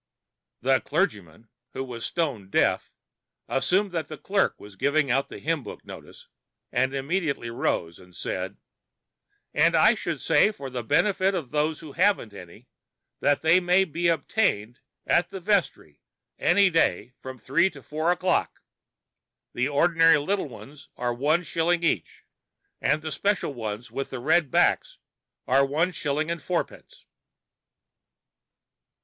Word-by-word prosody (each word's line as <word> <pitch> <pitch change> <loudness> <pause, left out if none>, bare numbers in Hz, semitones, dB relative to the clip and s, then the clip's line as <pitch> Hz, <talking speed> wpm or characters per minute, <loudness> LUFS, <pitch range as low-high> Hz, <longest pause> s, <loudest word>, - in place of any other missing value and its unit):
The 130 +1 +3
clergyman, 115 - -2 0.3
who 135 - -3
was 120 -3 -7
stone 135 - -2
deaf, - - +1 0.6
assumed 185 - +1
that 165 -4 -3
the 155 - -8
clerk 195 0 0
was 100 -1 -13
giving 140 +4 +1
out 135 +2 +1
the - - -8
hymn 165 -1 -1
book 105 - -10
notice, - - -12 0.4
and 130 +2 0
immediately 140 -4 -2
rose 85 -8 -2
and 90 -1 -17
said: - - -4 1.0
"And 165 +3 +3
I 215 +8 +6
should 170 - -4
say, 160 +8 +4
for 140 -11 -8
the 125 -1 -3
benefit 185 - +2
of 150 -9 -4
those 150 +1 0
who 155 -3 -10
haven't 180 - +1
any, 90 -4 -13 0.5
that 145 +1 +1
they 165 +3 +5
may 180 +1 +3
be 170 +1 -1
obtained 140 - 0 0.3
at 175 0 +2
the 195 - -7
vestry 180 - -1 0.4
any 195 +1 +4
day 165 -6 +1
from 130 0 -8
three 150 - +2
to 140 -7 -14
four 155 +7 -1
o'clock; 180 +1 0 0.9
the 125 +2 0
ordinary 165 +2 +4
little 170 +2 -1
ones 140 +3 -13
at 125 0 -1
one 150 +8 +1
shilling 170 +1 0
each, 165 - -1 0.6
and 155 0 +1
special 200 +2 0
[Pg 130 - -11 0.3
49]ones - - -16
with 135 +3 -5
red 145 +4 +2
backs - - +2 0.5
at 135 +2 +4
one 165 +6 +1
shilling 155 0 -2
and 170 -2 -4
fourpence." 185 - -5
155 Hz, 145 wpm, -25 LUFS, 130-175 Hz, 1.0 s, I